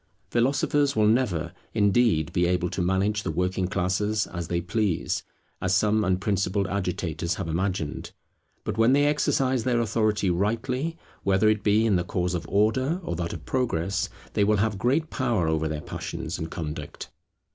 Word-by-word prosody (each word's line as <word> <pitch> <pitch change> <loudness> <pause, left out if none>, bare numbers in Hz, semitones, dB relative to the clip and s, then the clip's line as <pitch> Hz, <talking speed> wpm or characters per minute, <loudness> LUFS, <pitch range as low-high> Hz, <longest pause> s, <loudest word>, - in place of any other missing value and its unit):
Philosophers 140 +3 +2
will 110 - +3
never, 100 -8 +1 0.2
indeed, 105 -6 +3
be 90 0 +2
able 90 -1 0
to 90 - -2
manage 95 +4 +1
the 95 - -3
working 90 +3 0
classes 100 +4 0
as 85 -2 -5
they 85 0 0
please, 95 0 -1 0.4
as 95 0 +2
some 110 +1 +3
unprincipled 95 +1 0
agitators 90 -3 -2
have - - -4
imagined; 85 -2 -2 0.5
but - - -3
when 115 +3 +5
they 145 +1 +4
exercise 135 -4 +1
their 125 -2 +1
authority 110 -3 +1
rightly, 125 - -1 0.2
whether 100 +2 +3
it 110 -1 +1
be 105 +2 +3
in 105 -5 +3
the 90 - 0
cause 90 0 -1
of 85 -1 -3
Order 120 - +2
or 85 - -3
that 85 0 -3
of - - -8
Progress, 100 -7 -1 0.2
they 105 - +2
will 105 +1 +3
have 105 -1 0
great 145 +8 +1
power 120 - 0
over 80 0 +1
their 75 -1 -3
passions - - -5
and 80 - -4
conduct. 75 -3 -6
100 Hz, 170 wpm, -26 LUFS, 90-115 Hz, 0.5 s, when